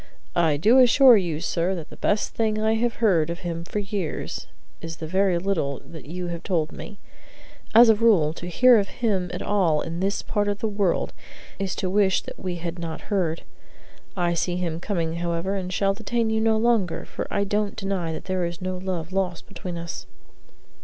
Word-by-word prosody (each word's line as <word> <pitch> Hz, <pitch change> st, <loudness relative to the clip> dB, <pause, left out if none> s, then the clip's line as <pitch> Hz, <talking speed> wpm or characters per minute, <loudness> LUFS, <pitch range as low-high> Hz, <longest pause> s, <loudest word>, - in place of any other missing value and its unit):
I 160 Hz, -4 st, +3 dB
do 225 Hz, -, +5 dB
assure 255 Hz, 0 st, +7 dB
you, 170 Hz, -7 st, 0 dB
sir, 175 Hz, +1 st, 0 dB
that 165 Hz, -4 st, -8 dB
the -, -, -10 dB
best 210 Hz, 0 st, 0 dB
thing 215 Hz, -1 st, 0 dB
I 220 Hz, +1 st, +2 dB
have 230 Hz, +1 st, 0 dB
heard 175 Hz, -9 st, +2 dB
of 170 Hz, +1 st, -5 dB
him 170 Hz, -1 st, -4 dB
for 175 Hz, -, -6 dB
years 195 Hz, -5 st, -3 dB, 0.3 s
is 165 Hz, -1 st, -6 dB
the 160 Hz, -, -6 dB
very 185 Hz, +2 st, +2 dB
little 170 Hz, -7 st, -1 dB
that 160 Hz, -3 st, -11 dB
you 180 Hz, +3 st, -5 dB
have 170 Hz, -1 st, -5 dB
told 165 Hz, -5 st, -1 dB
me. 205 Hz, -, -9 dB, 0.8 s
As 235 Hz, +1 st, +9 dB
a 225 Hz, -, +7 dB
rule, 205 Hz, -9 st, +3 dB
to 175 Hz, -, -8 dB
hear 245 Hz, +6 st, +6 dB
of 200 Hz, -, -1 dB
him 195 Hz, -7 st, -1 dB
at -, -, -4 dB
all 180 Hz, -7 st, +2 dB
in 165 Hz, +1 st, -4 dB
this 195 Hz, +2 st, -1 dB
part 205 Hz, -1 st, -1 dB
of 205 Hz, 0 st, 0 dB
the 220 Hz, -, -2 dB
world, 200 Hz, -4 st, 0 dB, 0.5 s
is 195 Hz, -1 st, -2 dB
to 190 Hz, -, -2 dB
wish 190 Hz, 0 st, +2 dB
that -, -, -10 dB
we 185 Hz, -2 st, -3 dB
had 170 Hz, 0 st, -5 dB
not 165 Hz, +4 st, -6 dB
heard. 170 Hz, -5 st, 0 dB, 0.7 s
I 175 Hz, -1 st, +1 dB
see 175 Hz, +1 st, -1 dB
him 170 Hz, -2 st, -2 dB
coming, 170 Hz, -4 st, -2 dB
however, 170 Hz, +2 st, -2 dB
and 185 Hz, -2 st, -3 dB
shall 195 Hz, +1 st, +1 dB
detain 225 Hz, +2 st, -1 dB
you 220 Hz, 0 st, +1 dB
no 220 Hz, 0 st, +3 dB
longer, 220 Hz, -6 st, +1 dB
for -, -, -5 dB
I 200 Hz, -, 0 dB
don't 205 Hz, 0 st, -1 dB
deny 195 Hz, -4 st, -2 dB
that 160 Hz, -, -6 dB
there 185 Hz, -1 st, -1 dB
is 170 Hz, -1 st, -4 dB
no 185 Hz, 0 st, -3 dB
love 180 Hz, -3 st, -4 dB
lost 185 Hz, -3 st, -1 dB
between 180 Hz, -2 st, -6 dB
us." 170 Hz, 0 st, -7 dB
185 Hz, 205 wpm, -24 LUFS, 170-205 Hz, 0.8 s, As